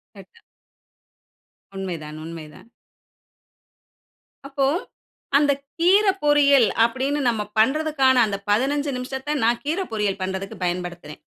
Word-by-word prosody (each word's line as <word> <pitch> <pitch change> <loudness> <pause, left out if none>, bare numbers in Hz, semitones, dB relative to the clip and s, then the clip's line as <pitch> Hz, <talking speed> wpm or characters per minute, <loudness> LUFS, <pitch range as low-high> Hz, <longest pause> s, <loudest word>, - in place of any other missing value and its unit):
கட்டா 460 -1 -16 1.3
உண்மைதான், 165 -6 -6
உண்மைதான். 160 +4 -10 1.8
அப்போ 275 -1 0 0.7
அந்த 290 0 +3 0.3
கீர 380 +5 +4 0.2
பொரியல், 285 -4 +5 0.2
அப்படீன்னு 265 +5 -1
நம்ம 220 -3 -1 0.2
பண்றதுக்கான 270 +2 +3
அந்த 200 -2 -3
15 280 +7 +1
நிமிஷத்த 265 +3 -4
நான் 235 +1 +1
கீர 320 +6 -1
பொரியல் 205 -3 -1
பண்றதுக்கு 190 +1 -4
பயன்படுத்துறேன். 175 -3 -4
250 Hz, 95 wpm, -22 LUFS, 190-290 Hz, 1.8 s, பொரியல்